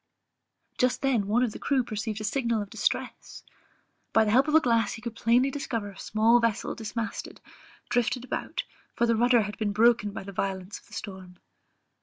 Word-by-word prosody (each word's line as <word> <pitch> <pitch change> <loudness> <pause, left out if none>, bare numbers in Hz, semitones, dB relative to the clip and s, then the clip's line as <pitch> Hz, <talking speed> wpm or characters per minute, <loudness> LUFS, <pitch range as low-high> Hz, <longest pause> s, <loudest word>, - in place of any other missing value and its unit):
Just 250 +2 +1
then 245 -7 +2
one 230 +4 +2
of 240 - 0
the - - -9
crew 270 -3 +1
perceived 215 -1 -4
a - - -5
signal 235 0 0
of 200 - -14
distress; 220 -1 -3 0.7
by 220 0 +5
the 210 - +1
help 260 +6 +4
of 305 - +2
a - - +9
glass 230 -6 +1
he 225 - -8
could 235 -2 -5
plainly 245 +4 +3
discover 230 -7 -3
a 195 - -15
small 225 +3 +3
vessel 230 -3 0
dismasted, 225 0 -5 0.5
drifted 245 +1 0
about, - - -3 0.3
for 235 - +2
the 230 -1 +2
rudder 240 0 +4
had 210 0 -7
been 210 -2 0
broken 230 0 +4
by 205 - -7
the 195 - -8
violence 190 0 -3
of - - -25
the - - -18
storm. 190 -4 -8
225 Hz, 195 wpm, -27 LUFS, 210-245 Hz, 0.7 s, a